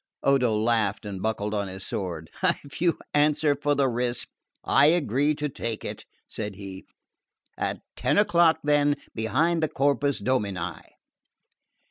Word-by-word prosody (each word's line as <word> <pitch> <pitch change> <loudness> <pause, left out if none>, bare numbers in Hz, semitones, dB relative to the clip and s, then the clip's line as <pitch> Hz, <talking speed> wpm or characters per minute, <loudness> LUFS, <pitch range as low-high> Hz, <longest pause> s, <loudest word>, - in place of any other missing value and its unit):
Odo 125 -5 +3
laughed 110 -2 +1
and 100 -2 -5
buckled 105 -1 -1
on 100 -1 -1
his 95 0 -8
sword. 85 -5 -4 0.3
"If 140 0 -10
you 170 -2 +3 0.2
answer 150 0 +3
for 145 +1 0
the 140 -1 +3
risk, 120 0 -1 0.4
I 135 +3 +5
agree 150 -2 +2
to 150 0 -2
take 115 -5 -5
it," - - -6 0.2
said 105 -2 -5
he. 95 -1 -9 0.7
"At - - -3
ten - - +1
o'clock 175 -5 +4
then, 145 0 +3 0.2
behind 160 +10 +1
the 155 - +1
Corpus 140 0 +1
Domini." 100 -6 -1
130 Hz, 140 wpm, -26 LUFS, 105-145 Hz, 0.7 s, I